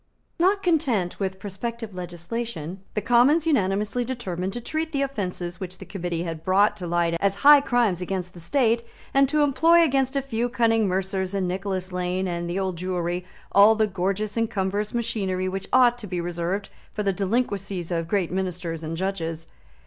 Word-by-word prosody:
Not 390 +3 +3
content 265 - +1
with 190 -1 -2
prospective 215 +3 -5
legislation, 180 0 -5 0.2
the 210 - 0
Commons 260 +7 +4
unanimously 210 -4 +1
determined 195 -7 -3
to 240 - -4
treat 315 +6 -3
the 275 -1 +1
offences 185 -9 -4
which 185 -1 -6
the - - -10
Committee 175 -3 -3
had 165 -2 -5
brought 195 +4 +3
to 180 - -5
light 170 0 +1
as 200 +1 +2
high 290 -1 +10
crimes 235 -9 +1
against 180 0 -3
the 175 - -11
State, 230 - +2 0.3
and 275 -1 +4
to 300 0 +3
employ 330 +4 +5
against 270 -3 +1
a 275 - +1
few 240 -2 -1
cunning 225 -3 +2
mercers 190 +1 -1
in 190 -2 0
Nicholas 185 0 -3
Lane 180 +1 -1
and 170 -1 -3
the 175 - -2
Old 190 -2 -2
Jewry 180 -1 -2 0.3
all 205 +3 +7
the 220 0 +3
gorgeous 195 +2 -2
and 230 -1 +1
cumbrous 200 +1 -1
machinery 195 -6 -1
which 190 +1 -4
ought 245 -1 +5
to 210 - -8
be 180 -1 -3
reserved 175 +3 -2 0.3
for 210 - -1
the 195 -1 +1
delinquencies 195 -3 -2
of 165 -1 -1
great 185 -2 0
Ministers 180 -3 -3
and 160 +1 -4
Judges. 165 -4 -3
195 Hz, 180 wpm, -25 LUFS, 180-235 Hz, 0.3 s, high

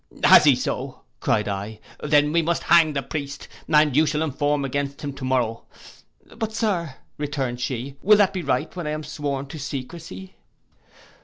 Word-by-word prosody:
'Has - - +8
he - - +6
so?' - - -4 0.2
cried 105 - +1
I, 100 +2 -4 0.2
'then 150 0 +3
we 170 +1 +3
must 170 +1 -1
hang 165 -3 +5
the 140 -1 -2
priest, 140 0 -6 0.2
and 150 -3 +4
you 155 +1 +4
shall 150 +1 0
inform 145 -1 0
against 140 +1 -3
him 140 -1 -4
to 135 - -10
morrow.'—'But 130 - -4
Sir,' 180 - -1 0.2
returned 135 -4 -3
she, 130 +2 -4
'will 210 +2 +6
that 200 -2 +3
be 185 - -2
right, 145 +1 -1
when 175 -4 -4
I - - -1
am 155 0 -4
sworn 145 -2 -4
to 150 +3 -9
secrecy? 165 +8 -7
145 Hz, 170 wpm, -23 LUFS, 135-160 Hz, 0.2 s, Has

